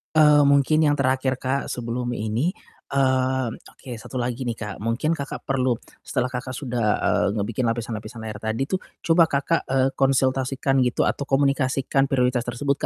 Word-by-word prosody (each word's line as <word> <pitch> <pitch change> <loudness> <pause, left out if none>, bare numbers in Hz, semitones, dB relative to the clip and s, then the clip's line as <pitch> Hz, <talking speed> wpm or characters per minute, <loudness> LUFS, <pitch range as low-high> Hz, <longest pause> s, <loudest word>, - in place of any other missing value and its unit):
Eee, 150 -1 +6
mungkin 140 +2 +4
yang 145 - +3
terakhir, 130 -1 +1
Kak, 130 +2 -2
sebelum 120 0 -3
ini, 115 - -1 0.4
eee, 130 -1 +2
oke 125 +2 -12
1 130 - -11
lagi 125 +1 -2
nih, 115 - -1
Kak, 105 -3 -6
mungkin 115 +8 0
Kakak 145 -4 -4
perlu, 130 -3 +1 0.2
setelah 125 -2 -2
Kakak 130 +1 -4
sudah, 120 -4 -2 0.2
eee, - - +2
ngebikin 115 +4 -1
lapisan-lapisan 115 0 -4
layar 105 -1 -6
tadi 110 +4 -2
tuh, 185 +7 -2 0.2
coba, 165 0 +5
Kakak, 140 +4 0
eee, 135 0 +2
konsultasikan 135 0 +1
gitu 120 - 0
atau 140 - -1
komunikasikan 135 0 +1
prioritas 125 -2 +1
tersebut 140 +3 -1
130 Hz, 160 wpm, -23 LUFS, 120-140 Hz, 0.4 s, Eee